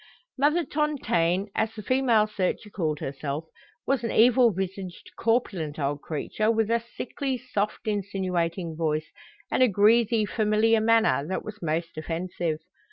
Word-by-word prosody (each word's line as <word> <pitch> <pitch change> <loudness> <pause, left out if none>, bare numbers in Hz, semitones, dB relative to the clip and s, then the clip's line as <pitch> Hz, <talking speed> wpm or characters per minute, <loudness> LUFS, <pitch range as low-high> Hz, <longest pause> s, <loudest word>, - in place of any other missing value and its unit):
Mother 300 +5 +2
Tontaine, 205 - 0
as 220 0 -1
the 215 - -7
female 245 -2 +3
searcher 210 0 -2
called 155 -6 -2
herself, 140 +3 -4 0.4
was 270 -3 0
an 230 - -1
evil 240 +1 +5
visaged, 190 -1 -5
corpulent 195 -10 0
old 145 -1 -2
creature, 190 +7 -2
with 225 -1 +1
a 235 - +3 0.2
sickly, 265 0 -3
soft, 220 -5 -3
insinuating 185 -4 -2
voice, 155 -1 -1 0.4
and - - +1
a 255 - +7
greasy, 220 +2 +4
familiar 215 +2 +2
manner 225 -8 +3
that 190 - -3
was 215 0 -8
most 165 0 -2
offensive. 165 0 -3
205 Hz, 140 wpm, -26 LUFS, 170-230 Hz, 0.4 s, a